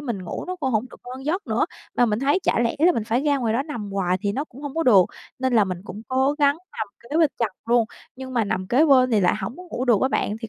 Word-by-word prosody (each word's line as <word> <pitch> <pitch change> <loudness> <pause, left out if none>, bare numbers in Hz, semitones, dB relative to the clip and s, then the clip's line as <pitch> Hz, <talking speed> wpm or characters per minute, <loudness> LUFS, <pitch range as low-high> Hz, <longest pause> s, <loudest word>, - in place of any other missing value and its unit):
mình 235 -10 -4
ngủ - - -5
nó 365 0 -4
cũng 275 -6 -2
hổng 220 +3 +1
được - - -14
ngon 260 +2 -8
giấc 360 +7 -2
nữa. - - +1 0.3
Mà 245 - +4
mình 210 0 0
thấy 280 +6 +2
chả - - +1
lẽ 235 +4 0
là 345 +4 +5
mình 230 - -2
phải 235 +3 0
ra 290 -1 +2
ngoài 230 -4 0
đó 255 +4 +1
nằm 235 -10 -6
hoài 185 -2 +1
thì 200 -1 0
nó 275 +7 -2
cũng 275 -1 -14
hông 285 0 -5
có 330 - 0
được 205 - +6 0.3
nên 260 -1 0
là 215 -3 +5
mình 185 -2 -4
cũng 210 +2 -8
cố 265 +2 +2
gắng 285 -1 +4 0.2
nằm 220 -2 -4
kế 255 +6 -5
bên 315 -4 +4
chồng 215 -5 -1
luôn. 235 -1 +4 0.3
Nhưng 260 0 -7
mà 230 - +2
nằm 185 -2 -2
kế 260 +10 +4
bên 255 -4 +5
thì 220 -3 +3
lại 180 - +3
hổng 195 +7 -5
có 360 - -10
ngủ 260 -8 -4
được 235 -5 +3
á 260 - +3
bạn, 210 -4 -1
thì 225 - -6
245 Hz, 305 wpm, -23 LUFS, 215-280 Hz, 0.3 s, được